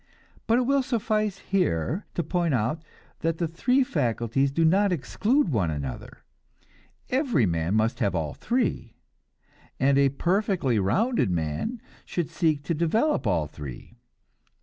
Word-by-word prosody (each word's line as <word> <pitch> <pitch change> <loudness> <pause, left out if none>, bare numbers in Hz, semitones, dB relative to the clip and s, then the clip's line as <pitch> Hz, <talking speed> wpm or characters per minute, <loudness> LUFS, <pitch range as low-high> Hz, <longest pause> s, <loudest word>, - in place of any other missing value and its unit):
But 230 +1 +4
it - - +3
will 275 +2 +2
suffice 215 -5 -1
here 180 - -1
to 170 - 0
point 170 -5 0
out 120 +8 -1 0.4
that 165 0 -1
the 170 - 0
three 250 - +2
faculties 135 - 0
do 165 +4 +2
not 195 +4 +3
exclude 215 - +1
one 105 - +1
another; 70 -5 -6 0.9
every 250 - +2
man 85 +2 0
must 110 +1 +1
have 100 - 0
all 75 -4 -2
three, 230 - -2 0.8
and 135 +1 +3
a 140 -1 +4
perfectly 175 - 0
rounded 205 - +1
man 85 - -2 0.2
should 170 -2 -3
seek 160 -4 +1
to 170 - -1
develop 170 - +1
all 85 -6 +1
three. 70 -4 -10
160 Hz, 140 wpm, -26 LUFS, -, 0.9 s, But